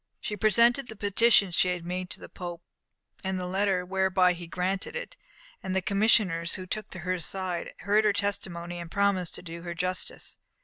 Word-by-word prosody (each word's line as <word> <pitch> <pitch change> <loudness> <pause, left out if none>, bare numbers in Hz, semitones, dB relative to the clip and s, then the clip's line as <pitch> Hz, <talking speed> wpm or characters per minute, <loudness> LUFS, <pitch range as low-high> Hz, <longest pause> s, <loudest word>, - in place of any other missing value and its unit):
She 210 - -3
presented 235 +5 +4
the 220 - -8
petition 205 -1 +4
she 180 - +3
had 175 -2 -3
made 180 +1 -3
to - - -4
the - - -9
Pope, 175 -2 -7 0.6
and 190 -1 -1
the 180 - -3
letter 190 0 +1
whereby 190 -1 +3
he 175 -1 -8
granted 185 - -2
it, - - -5 0.5
and 190 -1 -3
the - - +4
commissioners 200 -5 +3
took 215 -1 -3
her 185 +1 -2
aside, 180 0 -3
heard 205 +3 +3
her 210 -1 +4
testimony, 175 -4 -3
and 170 -1 -7
promised 200 -2 +1
to - - -9
do 170 -1 -7
her 170 0 -5
justice. 180 +1 -3
185 Hz, 180 wpm, -28 LUFS, 175-200 Hz, 0.6 s, presented